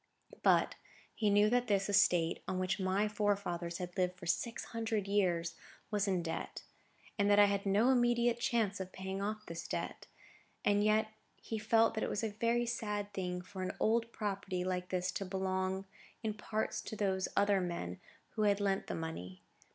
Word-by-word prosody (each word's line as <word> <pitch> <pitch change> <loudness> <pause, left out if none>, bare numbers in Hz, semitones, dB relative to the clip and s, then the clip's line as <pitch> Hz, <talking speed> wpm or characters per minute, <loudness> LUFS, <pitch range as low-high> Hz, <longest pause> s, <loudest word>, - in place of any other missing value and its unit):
But - - +4 0.4
he 215 -2 +1
knew 205 +1 +5
that 245 0 +2
this 195 -2 +2
estate—on 185 -3 +2
which 185 +1 0
my 190 +2 +1
forefathers 200 -5 -1
had 180 -1 -6
lived 180 -1 0
for 180 - -10
six 230 +8 -1
hundred 225 -3 -1
years—was 195 +2 -1
in 185 -3 +1
debt, 165 - -4 0.6
and 200 0 +3
that 205 - +6
I 205 - +9
had 200 0 0
no 210 +6 +4
immediate 240 -1 +3
chance 225 -5 +1
of 190 -1 -5
paying 190 +1 -4
off 215 +1 -3
this 170 0 -6
debt; - - -4 0.6
and 205 0 +4
yet 215 +1 +3 0.3
he 225 - -5
felt 225 +1 +4
that 220 - -2
it - - -1
was 210 - -2
a 220 - -1
very 235 +3 +1
sad 210 -3 -3
thing 180 -2 -3
for 185 +1 -8
an 185 - -3
old 230 +1 +2
property 195 -4 -2
like 180 0 -2
this 180 0 0
to - - -3
belong 190 0 -1 0.4
in 220 -1 0
part 215 +1 -2
to - - -5
those 190 -3 0
other 200 -1 +4
men, 170 - -4 0.3
who 220 - -4
had 205 -1 +3
lent 195 -1 0
the - - -3
money. 95 - -6
200 Hz, 180 wpm, -34 LUFS, 185-215 Hz, 0.6 s, I